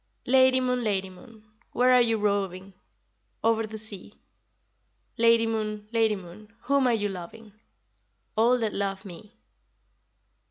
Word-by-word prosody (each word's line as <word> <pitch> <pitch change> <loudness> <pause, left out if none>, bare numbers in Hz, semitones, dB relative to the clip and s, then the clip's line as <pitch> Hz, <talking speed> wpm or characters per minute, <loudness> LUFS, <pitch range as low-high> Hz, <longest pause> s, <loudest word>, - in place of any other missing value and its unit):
Lady 260 0 +4
Moon, 250 -1 -1
Lady 195 -3 -1
Moon, 220 +4 -16 0.3
where 255 +1 +4
are 250 - +6
you 230 -2 +1
roving? 195 -2 -2 0.7
Over 225 -1 +1
the 220 0 -8
sea. 210 -1 -7 1.0
Lady 230 -1 +4
Moon, 215 -2 -3
Lady 225 -2 +2
Moon, 195 +3 -12
whom 280 -2 +2
are 245 - +3
you 205 -2 -1
loving? 200 +3 -9 0.8
All 235 +3 +3
that 225 -3 -2
love 195 -1 -3
me. 200 +4 -12
220 Hz, 130 wpm, -26 LUFS, 200-230 Hz, 1.0 s, are